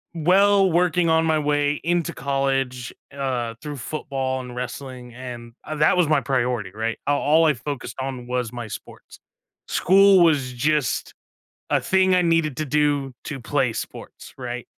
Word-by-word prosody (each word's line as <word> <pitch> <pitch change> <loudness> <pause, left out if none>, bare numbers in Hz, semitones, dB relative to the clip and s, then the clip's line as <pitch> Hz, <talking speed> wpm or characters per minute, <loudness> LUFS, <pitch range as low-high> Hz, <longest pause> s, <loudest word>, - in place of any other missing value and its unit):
well, 190 +3 +4
working 175 0 +2
on 160 0 +3
my 160 -1 +2
way 145 0 0
into 170 -1 0
college, 135 -2 -1 0.2
uh, 125 -4 -3
through 150 -1 -5
football 130 -1 -3
and 125 -1 -9
wrestling, 125 0 -7
and 120 -2 -8
uh - - -6
that 150 +3 +3
was 175 -3 +3
my 150 -2 +3
priority, 125 -5 -1
right? 110 +2 -3
Uh, 145 0 +3
all 155 +4 +3
I 155 - +4
focused 125 -1 -6
on 130 -2 -5
was 125 -2 -2
my 120 -2 -6
sports. - - -11 0.5
School 195 +1 +5
was 145 -7 +3
just 145 +2 0 0.5
a - - +3
thing 190 0 +2
I 180 - +4
needed 165 -5 +1
to 155 - -2
do 145 -2 0
to 140 - -5
play 130 0 0
sports, - - -8
right? 125 -1 -5
140 Hz, 160 wpm, -23 LUFS, 125-160 Hz, 0.5 s, School